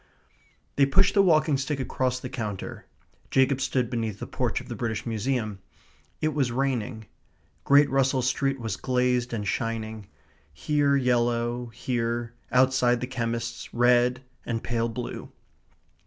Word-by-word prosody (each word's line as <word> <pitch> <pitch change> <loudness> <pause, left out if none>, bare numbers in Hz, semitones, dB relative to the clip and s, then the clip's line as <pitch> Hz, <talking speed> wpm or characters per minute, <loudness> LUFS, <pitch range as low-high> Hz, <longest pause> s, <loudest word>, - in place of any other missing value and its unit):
They 140 -1 +5
pushed 190 +8 +4
the 200 - +5
walking 155 -5 +4
stick 140 +1 -2
across 130 -1 -1
the 130 - -6
counter. 110 -6 -5 0.4
Jacob 130 0 +3
stood 130 -2 0
beneath 115 -4 -3
the - - -6
porch - - -1
of - - -11
the - - -5
British 110 -3 -3
Museum. 115 -2 -2 0.6
It 155 0 +1
was 135 -4 +1
raining. 125 -3 -2 0.6
Great 140 +1 +6
Russell 135 -1 +2
Street 135 +1 0
was 110 -5 -3
glazed 125 -1 +1
and 105 -3 -3
shining 110 -1 -3 0.4
here 145 - +1
yellow, 120 -1 +1
here, 120 0 -2 0.2
outside 125 -1 +3
the 125 - -2
chemist's, 115 -2 -4
red 125 +1 +3 0.2
and 115 -1 -3
pale 115 -1 -1
blue. 120 +1 -6
125 Hz, 140 wpm, -26 LUFS, 115-135 Hz, 0.6 s, Great